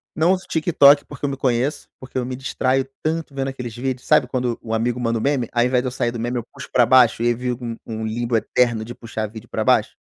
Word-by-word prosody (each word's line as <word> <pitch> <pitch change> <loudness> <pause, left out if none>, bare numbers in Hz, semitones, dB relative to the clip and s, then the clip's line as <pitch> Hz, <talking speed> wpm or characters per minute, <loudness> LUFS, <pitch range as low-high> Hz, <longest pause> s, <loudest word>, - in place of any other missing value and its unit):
Não 165 +4 +3
uso 190 0 -4
TikTok 150 -3 +5
porque 145 0 -6
eu - - 0
me 135 - -4
conheço, 130 +3 0
porque 130 0 -8
eu 125 - 0
me 125 0 -4
distraio 130 0 0
tanto 160 -1 -2
vendo 135 -1 -2
aqueles 125 -4 -6
vídeos, 130 0 -3
sabe, 150 -4 +4
quando 125 -2 -2
o 115 - -5
amigo 120 +2 0
manda 115 -1 0
um - - -5
meme, 135 -4 0
ao 120 0 +2
invés 125 0 +2
de 130 - -3
eu - - -3
sair 120 -1 -1
do 120 - -6
meme 120 +2 -2
eu 120 - -3
puxo - - -9
para 120 - +5
baixo, 120 -2 +5
e - - +2
aí 120 - +3
vivo 125 +1 -4
um 115 - -4
um 110 -1 -5
limbo 120 +2 -2
eterno 115 0 +1
de 120 - -7
puxar 110 -2 -5
vídeo 110 +1 -12
para - - -2
baixo. - - +2
125 Hz, 265 wpm, -21 LUFS, 115-135 Hz, -, TikTok